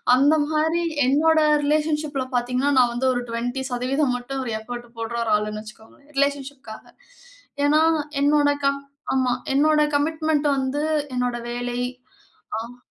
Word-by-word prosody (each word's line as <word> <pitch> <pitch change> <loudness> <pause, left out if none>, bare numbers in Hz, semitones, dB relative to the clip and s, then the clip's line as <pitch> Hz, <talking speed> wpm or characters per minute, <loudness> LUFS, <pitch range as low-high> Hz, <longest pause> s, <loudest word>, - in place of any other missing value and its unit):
அந்தமாரி 310 +4 +2 0.2
என்னோட 315 +4 +4 0.3
ரிலேஷன்ஷிப்ல 300 -2 0
பார்த்தீங்கனா, 250 +3 +1
நான் 240 -1 +4
வந்து 260 +2 0
ஒரு 245 - -1
20% 250 +3 -1
மட்டும் 265 +2 -5
ஒரு 235 - -3
எஃபோர்ட் 240 +2 -7
போட்ற 230 +1 -4
ஒரு 220 - -1
ஆளுன்னு 215 0 -4
வச்சுக்கோங்களேன், 220 +7 -16
ரிலேஷன்ஷிப்காக. 280 -5 -2 0.8
ஏன்னா, 305 +2 +4 0.4
என்னோட 290 0 +4 0.2
கம் 275 0 +1 0.3
ஆமா, 255 -1 +2 0.2
என்னோட 300 +2 +4
கமிட்மென்ட் 310 0 +1
வந்து 270 +3 -1 0.3
என்னோட 250 -1 0 0.2
வேலை 245 0 -3 0.8
ஆ. 235 +2 -9
270 Hz, 120 wpm, -23 LUFS, 245-295 Hz, 0.8 s, என்னோட